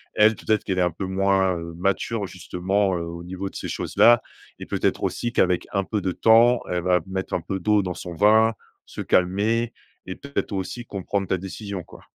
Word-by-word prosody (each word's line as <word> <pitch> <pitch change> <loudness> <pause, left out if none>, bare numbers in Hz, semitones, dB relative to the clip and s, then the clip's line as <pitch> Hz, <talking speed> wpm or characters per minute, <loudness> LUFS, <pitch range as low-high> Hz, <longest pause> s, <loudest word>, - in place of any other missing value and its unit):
Elle 105 +1 +5
peut-être 110 -1 0
qu'elle 95 -1 -1
est - - +3
un 90 - +3
peu 90 +4 -5
moins, 95 0 +2
heu, 85 0 -7
mature 100 +4 -1
justement, 95 +2 -1
heu, 85 - -3
au 85 +1 -7
niveau 95 +2 -5
de - - -20
ces - - -5
choses - - -5
là 120 0 +7 0.4
et - - -7
peut-être - - -1
aussi 120 - -2
qu'avec 90 -5 +2
un 100 - +1
peu 105 +2 -2
de 95 - -1
temps 115 +4 +5
elle 90 0 -1
va 90 0 +3
mettre 95 0 -3
un - - -1
peu 95 +3 -4
d'eau 105 +3 +3
dans 90 -1 -3
son 85 -1 -7
vin. 110 +4 +5 0.3
Se - - -7
calmer 105 +6 +1 0.3
et 95 - -5
peut-être 140 -6 -4
aussi 100 +5 -4
comprendre 100 0 -3
ta 95 - 0
décision, 95 0 -6
quoi. - - -15
95 Hz, 210 wpm, -24 LUFS, 90-105 Hz, 0.4 s, là